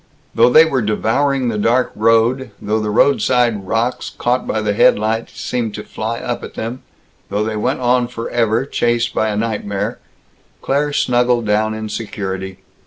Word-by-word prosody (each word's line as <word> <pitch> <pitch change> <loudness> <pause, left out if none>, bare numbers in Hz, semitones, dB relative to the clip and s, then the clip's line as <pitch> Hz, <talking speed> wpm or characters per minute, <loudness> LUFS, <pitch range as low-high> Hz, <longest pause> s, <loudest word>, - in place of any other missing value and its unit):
Though - - +5
they 155 +6 +7
were 135 -5 0
devouring 125 +5 0
the 105 -2 -2
dark 120 +4 +2
road, 115 +3 +2
though 110 +2 -1
roadside 110 -1 +2
rocks, 115 +4 -1
caught 125 +1 -1
by 110 - -1
the 105 -1 0
headlights, 110 +2 +1
seemed 115 -4 -2
to 105 - -6
fly 115 +2 -4
up 120 0 -4
at - - -9
them, 120 +3 -5 0.5
though 105 +1 0
they 110 0 -3
went 130 +5 -1
on 125 0 +2
forever, 115 0 -1
chased 120 -3 0
by 110 - +1
a 105 - -2
nightmare, 105 0 -2 0.6
Claire 145 +2 0
snuggled 120 -3 +1
down 110 +1 +1
in 110 0 -5
security. 95 -3 -5
115 Hz, 160 wpm, -18 LUFS, 105-125 Hz, 0.6 s, they